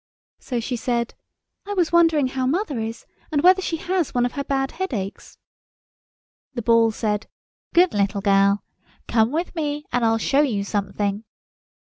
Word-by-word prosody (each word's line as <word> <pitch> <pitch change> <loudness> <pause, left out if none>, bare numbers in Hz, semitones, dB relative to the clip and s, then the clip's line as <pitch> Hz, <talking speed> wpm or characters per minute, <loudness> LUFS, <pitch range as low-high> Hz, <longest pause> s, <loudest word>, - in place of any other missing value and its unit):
So 245 -3 -3
she 245 +2 -3
said, 235 0 -1 0.5
"I 410 - -3
was 350 -4 +1
wondering 325 -5 +4
how 260 -1 -1
mother 300 - -1
is, 225 +1 -5 0.3
and 290 -1 +1
whether 370 +1 +6
she 335 -3 -2
has 355 -3 -1
one 245 0 +3
of 245 - -1
her 280 - -4
bad 270 -1 -1
headaches." 215 - -5 1.2
The 240 - -3
Ball 230 0 +4
said, 215 -1 -2 0.5
"Good 355 +1 +5
little 200 0 0
girl! 200 0 +3 0.4
Come 225 -1 +3
with 330 +4 -2
me 295 -3 -3
and 245 0 0
I'll 225 0 +3
show 275 +5 +2
you 225 -9 0
something." 200 0 -2
245 Hz, 160 wpm, -23 LUFS, 220-310 Hz, 1.2 s, whether